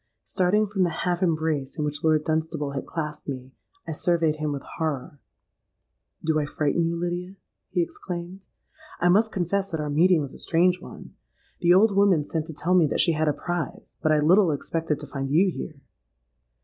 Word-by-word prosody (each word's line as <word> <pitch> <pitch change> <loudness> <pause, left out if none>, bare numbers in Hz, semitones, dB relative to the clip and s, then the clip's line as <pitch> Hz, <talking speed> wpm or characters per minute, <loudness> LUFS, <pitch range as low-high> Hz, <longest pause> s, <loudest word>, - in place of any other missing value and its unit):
Starting 195 +4 +2
from 200 -1 -2
the 180 - +3 0.2
half 175 0 0
embrace 155 -5 0
in 150 - -1
which 150 0 -4
Lord 155 -1 +3
Dunstable 155 -2 -1
had 140 - -5
clasped 150 -3 -5
me, 130 -2 -6 0.4
I - - -3
surveyed 160 -1 +1
him 155 -1 -2
with 140 -1 -4 0.2
horror. 145 -3 -3 1.0
'Do 160 -1 +2
I 150 - 0
frighten 150 +2 0
you, 170 - -1
Lydia?' 175 +2 -3 0.3
he 175 -2 +1
exclaimed. 175 +2 -7 0.5
'I 175 - +3
must 215 +5 +4
confess 195 +2 -1
that 160 -4 -3
our 150 -1 -2
meeting 165 +1 +4
is 135 - -7
a - - -11
strange 180 +2 +2
one. - - -11 0.5
The 175 0 +5
old 200 +1 +4
woman 195 -6 +4
sent 160 +1 -3
to 160 - -7
tell 160 +5 -1
me 175 -4 +5
that - - -2
she 170 - +4
had 155 0 0
a - - +4
prize; 175 0 -5
but 155 - +2
I 155 - +4
little 180 +4 +5
expected 155 +1 -2
to - - -6
find 135 -1 -4
you 175 +7 +4
here.' 150 -3 -7
165 Hz, 195 wpm, -25 LUFS, 150-180 Hz, 1.0 s, The